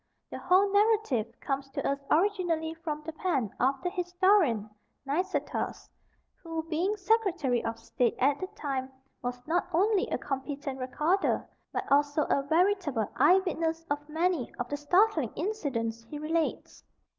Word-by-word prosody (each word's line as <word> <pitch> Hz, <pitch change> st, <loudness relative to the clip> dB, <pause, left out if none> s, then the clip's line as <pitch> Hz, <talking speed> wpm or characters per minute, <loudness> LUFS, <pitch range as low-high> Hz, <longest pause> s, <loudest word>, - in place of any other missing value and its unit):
The -, -, -5 dB
whole 375 Hz, +2 st, +4 dB
narrative 410 Hz, -, +3 dB
comes 275 Hz, 0 st, -3 dB
to -, -, -3 dB
us 280 Hz, 0 st, 0 dB
originally 335 Hz, -3 st, +1 dB
from 315 Hz, -2 st, -5 dB
the 320 Hz, -, -5 dB
pen 280 Hz, -, -1 dB
of 270 Hz, +2 st, +2 dB
the 360 Hz, -, -1 dB
historian 355 Hz, -, +2 dB, 0.4 s
Nicetas, 300 Hz, +1 st, -2 dB, 0.5 s
who, 325 Hz, -2 st, -4 dB
being 345 Hz, +6 st, -1 dB
Secretary 370 Hz, -, +1 dB
of 225 Hz, 0 st, -3 dB
State 230 Hz, +1 st, 0 dB
at 280 Hz, +2 st, +2 dB
the 370 Hz, -, -3 dB
time, 270 Hz, -8 st, -3 dB, 0.3 s
was 245 Hz, 0 st, -5 dB
not 345 Hz, +3 st, 0 dB
only 390 Hz, +4 st, +2 dB
a -, -, -1 dB
competent 275 Hz, 0 st, -4 dB
recorder, 300 Hz, +9 st, 0 dB, 0.2 s
but -, -, -2 dB
also 290 Hz, +1 st, +3 dB
a 280 Hz, -, +3 dB
veritable 320 Hz, -, +1 dB
eyewitness 330 Hz, -3 st, +2 dB
of 295 Hz, +1 st, -2 dB
many 325 Hz, -4 st, 0 dB
of 245 Hz, -, -3 dB
the 290 Hz, -, -2 dB
startling 320 Hz, -, +3 dB
incidents 270 Hz, -, -2 dB
he 295 Hz, -, -7 dB
relates. 315 Hz, +2 st, -2 dB
315 Hz, 145 wpm, -29 LUFS, 275-365 Hz, 0.5 s, whole